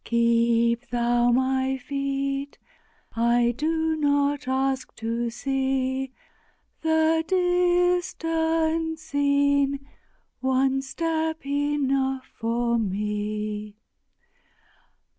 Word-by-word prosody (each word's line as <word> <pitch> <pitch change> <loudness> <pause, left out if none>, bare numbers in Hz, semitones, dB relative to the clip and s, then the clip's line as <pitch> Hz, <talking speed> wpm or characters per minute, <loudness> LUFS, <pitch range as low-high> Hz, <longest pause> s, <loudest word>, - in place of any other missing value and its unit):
Keep 235 +1 +2
Thou 240 0 +2
my 260 +1 +1
feet! 275 +1 -3 0.6
I 235 +1 +3
do 320 +3 0
not 285 -1 +1
ask 265 0 -1
to 230 +1 -2
see 265 +1 -1 0.7
The 320 0 +2
distant 350 -3 +1
scene! 280 -2 +1 0.5
one 265 +1 +1
step 320 +3 -2
enough 275 -2 0
for 235 +1 0
me. 210 +1 -3
270 Hz, 70 wpm, -25 LUFS, 240-315 Hz, 0.7 s, I